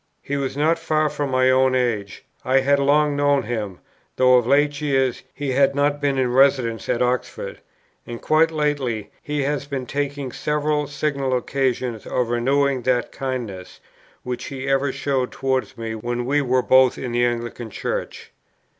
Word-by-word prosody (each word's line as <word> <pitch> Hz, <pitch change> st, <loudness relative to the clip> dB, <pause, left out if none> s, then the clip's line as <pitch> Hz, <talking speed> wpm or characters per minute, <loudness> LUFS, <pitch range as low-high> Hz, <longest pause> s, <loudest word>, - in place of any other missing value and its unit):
He 145 Hz, -, -3 dB
was 140 Hz, -1 st, -3 dB
not 160 Hz, +3 st, +2 dB
far 155 Hz, -1 st, +1 dB
from 145 Hz, -1 st, -3 dB
my 130 Hz, 0 st, +3 dB
own 130 Hz, 0 st, +3 dB
age; 110 Hz, -6 st, -2 dB, 0.2 s
I 130 Hz, +1 st, +3 dB
had 140 Hz, +1 st, +3 dB
long 145 Hz, +1 st, +3 dB
known 145 Hz, -1 st, +2 dB
him, 105 Hz, -5 st, -4 dB, 0.4 s
though 130 Hz, 0 st, +4 dB
of 125 Hz, -2 st, +4 dB
late 145 Hz, +1 st, +2 dB
years 135 Hz, -4 st, +1 dB
he 145 Hz, -1 st, -4 dB
had 135 Hz, +1 st, +3 dB
not 145 Hz, +1 st, +1 dB
been 140 Hz, -1 st, +1 dB
in 125 Hz, -2 st, +1 dB
residence 130 Hz, -4 st, +2 dB
at 120 Hz, -, +2 dB
Oxford; 125 Hz, 0 st, -3 dB, 0.5 s
and 120 Hz, -1 st, -6 dB
quite 155 Hz, +1 st, +3 dB
lately, 145 Hz, -9 st, -2 dB
he 145 Hz, -1 st, -2 dB
has 145 Hz, 0 st, -2 dB
been 135 Hz, -3 st, -4 dB
taking 140 Hz, 0 st, -3 dB
several 150 Hz, +1 st, -1 dB
signal 140 Hz, -2 st, -1 dB
occasions 125 Hz, -3 st, -2 dB
of 125 Hz, -2 st, -1 dB
renewing 135 Hz, +2 st, +1 dB
that 125 Hz, -1 st, 0 dB
kindness, 120 Hz, -9 st, -5 dB, 0.4 s
which 125 Hz, 0 st, -4 dB
he 135 Hz, -1 st, -6 dB
ever 135 Hz, 0 st, +1 dB
showed 135 Hz, -1 st, -1 dB
towards 130 Hz, -4 st, -2 dB
me 115 Hz, -1 st, -4 dB
when 120 Hz, +2 st, -3 dB
we 145 Hz, +3 st, +2 dB
were 130 Hz, -1 st, +1 dB
both 130 Hz, -1 st, +5 dB
in 125 Hz, -, -4 dB
the 120 Hz, +1 st, +1 dB
Anglican 120 Hz, -1 st, -2 dB
Church. -, -, -5 dB
135 Hz, 170 wpm, -22 LUFS, 125-145 Hz, 0.5 s, both